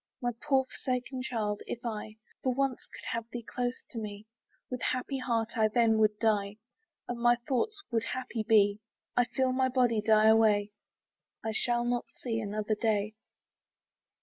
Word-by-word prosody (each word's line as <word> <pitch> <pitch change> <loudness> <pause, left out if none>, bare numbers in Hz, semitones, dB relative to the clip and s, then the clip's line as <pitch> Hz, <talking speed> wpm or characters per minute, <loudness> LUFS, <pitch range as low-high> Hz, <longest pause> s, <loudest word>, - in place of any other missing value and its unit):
My 245 -3 0
poor 265 -2 +3
forsaken 255 0 -3
child! 220 -5 -2
if 240 +2 -5
I 215 -1 -4 0.3
For 255 -2 0
once 270 -2 -1
could - - -11
have 230 0 -3
thee 235 -1 -6
close 245 0 -3
to 235 - -4
me, 210 -1 -6 0.4
With 250 -1 -5
happy 255 +2 -1
heart 230 -2 -1
I 215 - +5
then 225 0 +3
would 210 -1 +3
die, 210 -2 +1 0.5
And 240 -1 -4
my 240 0 +5
last 240 0 -6
thoughts 400 - 0
would 230 -1 +1
happy 250 -3 -3
be, 210 -2 +4 0.4
I 245 - +4
feel 260 +1 0
my 260 0 +2
body 245 -4 +2
die 215 0 +5
away, 215 -2 +5 0.7
I 220 - 0
shall 240 +2 +1
not 240 0 0 0.2
see 225 -3 -1
another 215 0 -1
day. 215 -1 0
230 Hz, 170 wpm, -30 LUFS, 215-250 Hz, 0.7 s, I